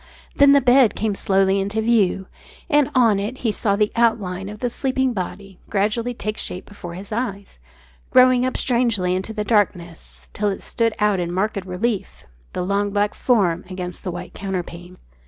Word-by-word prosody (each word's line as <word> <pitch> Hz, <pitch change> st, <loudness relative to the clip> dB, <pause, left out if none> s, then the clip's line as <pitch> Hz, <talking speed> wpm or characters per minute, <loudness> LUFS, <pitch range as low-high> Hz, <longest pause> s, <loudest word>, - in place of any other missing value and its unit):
Then 280 Hz, 0 st, +6 dB
the 280 Hz, -, +5 dB
bed 250 Hz, -2 st, +5 dB
came 215 Hz, -1 st, -1 dB
slowly 195 Hz, 0 st, +2 dB
into 200 Hz, +3 st, -2 dB
view. 215 Hz, -4 st, +2 dB, 0.5 s
And 295 Hz, -1 st, +4 dB
on 230 Hz, -6 st, +4 dB
it 215 Hz, +6 st, -4 dB
he 225 Hz, -, +3 dB
saw 200 Hz, -1 st, 0 dB
the 210 Hz, 0 st, +1 dB
outline 200 Hz, -5 st, 0 dB
of 210 Hz, -, -8 dB
the 245 Hz, -, -1 dB
sleeping 265 Hz, 0 st, 0 dB
body 195 Hz, -1 st, -6 dB
gradually 220 Hz, +4 st, 0 dB
take 215 Hz, -1 st, -4 dB
shape 180 Hz, -, -5 dB
before 175 Hz, -4 st, -9 dB
his 195 Hz, +3 st, -9 dB
eyes, 205 Hz, -, -4 dB, 0.5 s
growing 255 Hz, -1 st, +5 dB
up 255 Hz, -, -1 dB
strangely 230 Hz, -8 st, +1 dB
into 190 Hz, +4 st, -3 dB
the 215 Hz, -1 st, -3 dB
darkness, 180 Hz, -6 st, -2 dB
till 210 Hz, 0 st, 0 dB
it 195 Hz, -, -5 dB
stood 230 Hz, -2 st, 0 dB
out 210 Hz, -2 st, +2 dB
in 175 Hz, -1 st, -2 dB
marked 195 Hz, +2 st, -1 dB
relief 200 Hz, +3 st, -3 dB, 0.3 s
the 180 Hz, -, -2 dB
long 200 Hz, +1 st, 0 dB
black 205 Hz, +1 st, 0 dB
form 190 Hz, -8 st, +1 dB
against 180 Hz, -1 st, -6 dB
the 185 Hz, -, -3 dB
white 175 Hz, +1 st, -7 dB
counterpane. 180 Hz, -2 st, -6 dB
205 Hz, 175 wpm, -21 LUFS, 190-235 Hz, 0.5 s, Then